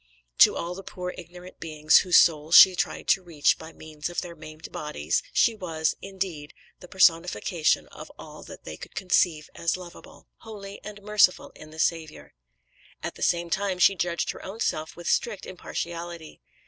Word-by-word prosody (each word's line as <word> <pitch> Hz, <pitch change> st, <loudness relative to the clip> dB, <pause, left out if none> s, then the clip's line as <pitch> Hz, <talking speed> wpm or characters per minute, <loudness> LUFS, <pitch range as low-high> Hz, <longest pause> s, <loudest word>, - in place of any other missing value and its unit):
To -, -, +7 dB
all 170 Hz, +1 st, -4 dB
the 190 Hz, -, -8 dB
poor, 180 Hz, -1 st, -6 dB
ignorant 180 Hz, +1 st, -12 dB
beings 155 Hz, -1 st, +3 dB
whose 180 Hz, -2 st, +4 dB
souls 155 Hz, 0 st, +4 dB
she 190 Hz, -1 st, +9 dB
tried -, -, -3 dB
to 195 Hz, -, +4 dB
reach 165 Hz, -5 st, +1 dB
by 160 Hz, 0 st, -10 dB
means 155 Hz, 0 st, -7 dB
of 175 Hz, -, -3 dB
their 175 Hz, -2 st, -9 dB
maimed 155 Hz, 0 st, -11 dB
bodies, 85 Hz, -, -2 dB
she 235 Hz, -, +3 dB
was, 165 Hz, -6 st, -2 dB
indeed, 185 Hz, -6 st, -6 dB, 0.2 s
the 180 Hz, -, -13 dB
personification 175 Hz, -2 st, +2 dB
of -, -, -11 dB
all -, -, -11 dB
that -, -, -12 dB
they 80 Hz, 0 st, -8 dB
could -, -, -12 dB
conceive 175 Hz, -4 st, +1 dB
as 170 Hz, +1 st, -1 dB
lovable, 180 Hz, -2 st, -13 dB
holy 205 Hz, -3 st, -10 dB
and 205 Hz, -1 st, -10 dB
merciful 210 Hz, -3 st, +2 dB
in 155 Hz, -, -13 dB
the 155 Hz, -, -14 dB
Saviour. 160 Hz, -1 st, -2 dB, 0.7 s
At -, -, -4 dB
the -, -, -15 dB
same 170 Hz, -1 st, 0 dB
time 195 Hz, 0 st, -1 dB
she 180 Hz, +2 st, +5 dB
judged 175 Hz, -2 st, -2 dB
her -, -, -12 dB
own 195 Hz, +4 st, -8 dB
self 155 Hz, -7 st, -2 dB
with 175 Hz, 0 st, -9 dB
strict 215 Hz, -5 st, 0 dB
impartiality. 170 Hz, -2 st, -7 dB
175 Hz, 175 wpm, -26 LUFS, 160-185 Hz, 0.7 s, she